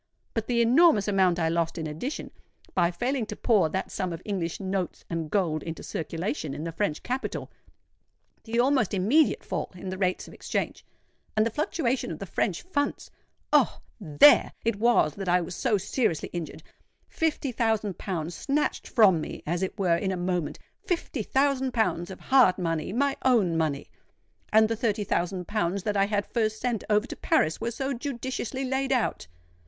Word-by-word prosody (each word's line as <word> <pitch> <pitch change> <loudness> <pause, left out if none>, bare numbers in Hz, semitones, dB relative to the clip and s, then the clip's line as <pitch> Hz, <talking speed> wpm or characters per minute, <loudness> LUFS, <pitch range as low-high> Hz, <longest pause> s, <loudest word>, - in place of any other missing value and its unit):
But 225 -1 -2
the 235 -1 +3
enormous 245 - +5
amount 190 -4 +3
I 165 -2 +1
lost 165 +1 0
in 160 - -3
addition, 160 - -5 0.4
by 175 -2 +3
failing 240 +5 -2
to - - -5
pour 205 -9 +3
that 190 +4 -3
sum 185 -2 -2
of 165 0 -6
English 180 -5 -2
notes 190 -2 -3
and 165 -2 -2
gold 165 -6 0
into 165 +1 -6
circulation 165 - -3
in 150 - -5
the 165 - -3
French 165 -3 -2
capital,—the 240 -2 -7
almost 255 -5 +2
immediate 235 +12 +3
fall - - -3
in 185 +1 -7
the 185 0 -5
rates 185 -2 0
of - - -12
exchange, - - -3 0.5
and 215 - +4
the 230 - 0
fluctuation 285 - -1
of 160 - -5
the 195 - -6
French 175 0 -1
funds,—Oh! 290 -6 -1 0.2
there 170 - +6
it 230 -3 +1
was 225 -9 +3
that 195 0 -4
I 180 +1 +4
was 175 0 -5
so 235 -6 +1
seriously 190 - -1
injured. 170 -3 -5 0.4
Fifty 305 -4 -1
thousand 220 -4 0
pounds 175 -3 -3
snatched 290 - -1
from 195 -9 +5
me - - -7
as 170 +3 -1
it 190 +3 -3
were 180 -4 +3
in 190 +3 -1
a 185 - -2
moment,—fifty 180 - -3
thousand 265 +2 +1
pounds 180 -5 0
of 190 - -8
hard 255 -9 +4
money—my 185 - -1
own 220 -10 +3
money! 155 -3 -1 0.6
And 220 0 +6
the 225 - -1
thirty 215 -2 0
thousand 180 -1 -1
pounds 200 -3 -1
that 210 -1 -1
I 195 0 +4
had 205 0 -1
first 220 -2 -1
sent 240 -4 -1
over 210 +1 +3
to - - -7
Paris 155 +5 +1
were 230 - -1
so 265 +4 -3
judiciously 260 0 -4
laid 265 +1 -1
out! 250 - 0
205 Hz, 175 wpm, -27 LUFS, 175-245 Hz, 0.6 s, there